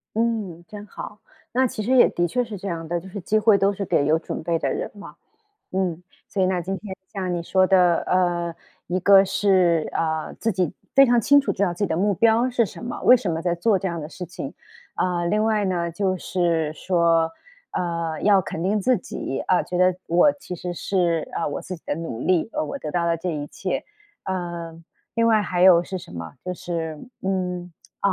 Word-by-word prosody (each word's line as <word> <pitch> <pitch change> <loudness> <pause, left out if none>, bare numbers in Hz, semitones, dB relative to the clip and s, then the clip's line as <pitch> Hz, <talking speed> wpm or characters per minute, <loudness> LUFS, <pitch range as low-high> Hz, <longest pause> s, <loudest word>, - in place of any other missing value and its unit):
嗯， 215 -7 -1
真 205 -1 -9
好。 210 +1 -9 0.3
那 260 +2 +3
其 215 - -5
实 240 - -1
也 250 - +7
的 175 0 0
确 245 +9 0
是 225 -3 -7
这 195 +2 -7
样 165 -3 -4
的， 175 +1 -1
就 190 +3 -12
是 200 - -6
机 215 +5 +1
会 215 -1 +5
都 195 +1 +2
是 200 0 -4
给 145 - +2
有 155 +2 +3
准 - - -5
备 170 0 +1
的 - - -1
人 - - -3
嘛。 205 -1 -11 0.6
嗯， 180 -3 -1 0.3
所 195 - -1
以 - - +4
呢， 185 -1 0
今 190 +3 -3
天 195 0 -7 0.2
像 185 -3 -2
你 170 - -2
说 185 +2 +3
的， 180 -3 +4
呃， 175 -2 +1 0.3
一 180 - -1
个 195 +1 +7
是， 185 -4 +2
呃， 160 -1 -2
自 225 - 0
己 180 -4 0 0.2
非 275 - +8
常 240 -1 +4
清 285 +6 +5
楚 280 - -1
知 200 - -2
道 185 -3 +2
自 - - -17
己 205 - +2
的 160 - -1
目 200 +3 +2
标 230 +5 +3
是 240 -2 +2
什 215 - -9
么， 245 - -5
为 250 - +8
什 215 -7 -3
么 165 0 -2
在 175 -1 +1
做 195 +4 +2
这 190 - -3
样 170 -1 -4
的 150 - -6
事 180 - -7
情。 165 -5 -7 0.4
呃， 175 -1 0
另 210 +4 +1
外 215 -2 +1
呢， 175 -3 -1
就 185 +2 -1
是 165 -4 0
说， 165 -1 +2 0.4
呃， 170 -2 -2
要 200 -2 +5
肯 165 -2 -5
定 200 +3 +1
自 255 +5 +3
己， 135 -6 -5
啊， 180 - +3
觉 180 - -5
得 185 0 +4
我 175 - +4
其 280 -11 -8
实 175 +1 -5
是， 175 -3 0
啊， - - -2
我 145 - -4
自 185 - -6
己 160 - -21
的 - - -2
努 165 -8 -5
力， 180 +3 +1
呃， 310 +1 -1
我 280 - -5
得 155 - -5
到 170 +1 0
了 170 0 +1
这 175 +2 -3
一 145 -2 -4
切。 - - -3 0.4
呃， 175 -3 -4 0.4
另 230 0 +2
外 220 -2 +4
还 180 -3 -2
有 180 -2 +7
是 185 +2 -5
什 170 - -12
么， 85 -1 -7
就 180 0 -3
是， 165 -3 -4 0.2
嗯， 180 -2 -2 0.3
哦， 200 - +2
180 Hz, 245 characters per minute, -23 LUFS, 170-200 Hz, 0.6 s, 非